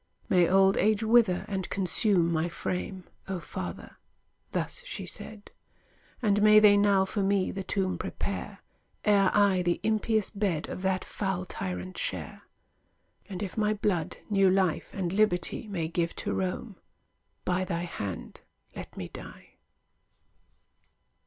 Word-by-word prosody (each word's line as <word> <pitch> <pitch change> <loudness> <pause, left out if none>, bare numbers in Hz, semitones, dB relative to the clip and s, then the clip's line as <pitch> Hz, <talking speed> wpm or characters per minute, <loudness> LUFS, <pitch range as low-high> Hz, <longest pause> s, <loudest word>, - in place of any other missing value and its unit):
"May 175 -2 +4
old 195 +1 +5
age 215 0 +2
wither 220 -5 +4
and 190 -2 -3
consume 185 -2 +2
my 165 +1 0
frame, 185 +2 -4 0.2
O 190 -2 -3
father,"—thus 485 - -7
she - - -6
said; 215 -2 -8 0.7
"And 205 -1 +3
may 215 0 +7
they 210 -1 +8
now 200 -1 +4
for 200 +2 -2
me 195 -1 +1
the 195 - -4
tomb 185 0 -1
prepare, - - -5 0.4
E'er 200 -3 +5
I 200 -3 +4
the 175 -1 0
impious 220 -1 +1
bed 195 -7 -1
Of - - -5
that 190 -1 0
foul 190 -2 -2
tyrant 90 - -5
share: - - -4 0.9
And 190 0 -4
if 190 - -5
my 215 -1 +1
blood 185 -6 -1
new 195 -2 +4
life 185 -3 +1
and 180 -2 -3
liberty 200 0 +1
May 175 -6 -2
give 170 0 -1
to - - -3
Rome, 190 +2 -3 0.7
by 185 +1 +1
thy 175 -2 -2
hand 100 - -6 0.3
let - - -9
me - - -4
die!" - - -11
190 Hz, 140 wpm, -28 LUFS, 180-205 Hz, 0.9 s, they